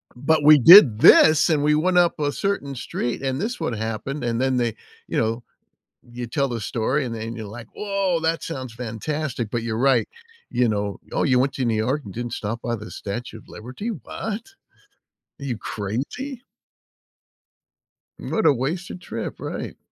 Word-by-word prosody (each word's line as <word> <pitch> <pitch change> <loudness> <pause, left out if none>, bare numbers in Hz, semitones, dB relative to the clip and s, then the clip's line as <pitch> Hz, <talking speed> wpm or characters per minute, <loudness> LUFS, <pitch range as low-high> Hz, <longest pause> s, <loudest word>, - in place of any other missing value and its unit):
"But 145 +4 +1
we 150 0 +8
did 135 - +9
this, 155 +5 +7
and 150 -2 +2
we 150 0 +3
went 180 +4 +2
up 175 -2 +3
a 145 -1 0
certain 170 -9 -2
street, 120 0 -4
and 135 0 -2
this 240 +1 -3
would 140 -8 -1
happen," 115 +5 -4
and 120 0 -1
then 130 -1 +1
they, 120 -3 0 0.3
you - - -3
know 115 +2 0 0.7
you 120 0 -6
tell 140 +3 -1
the 120 -2 -4
story, 125 +7 -1
and 120 - -4
then 115 +1 -5
you're 110 -2 -6
like, 110 +2 -10
"Whoa, 195 -4 0
that 165 +1 0
sounds 130 -7 -6
fantastic," 125 +2 -4
but 115 0 -2
you're 110 -1 -3
right, 130 -2 +3 0.4
you 120 -1 +2
know. 100 -1 -3
"Oh, - - 0
you 125 -2 +3
went 135 +2 +1
to 130 -2 -1
New 115 - +1
York 130 +7 0
and 100 - -9
didn't 120 0 -5
stop 115 +2 -4
by 120 -1 -2
the 110 +1 -9
Statue 110 +3 -6
of - - -19
Liberty? 125 - -7
What? 225 - -6 0.9
Are 140 - -7
you 125 -5 -2
crazy?" 135 - -5 1.8
What 220 - -2
a - - +6
wasted 165 +9 -4
trip, - - -6
right. - - -6
130 Hz, 180 wpm, -23 LUFS, 115-155 Hz, 1.8 s, did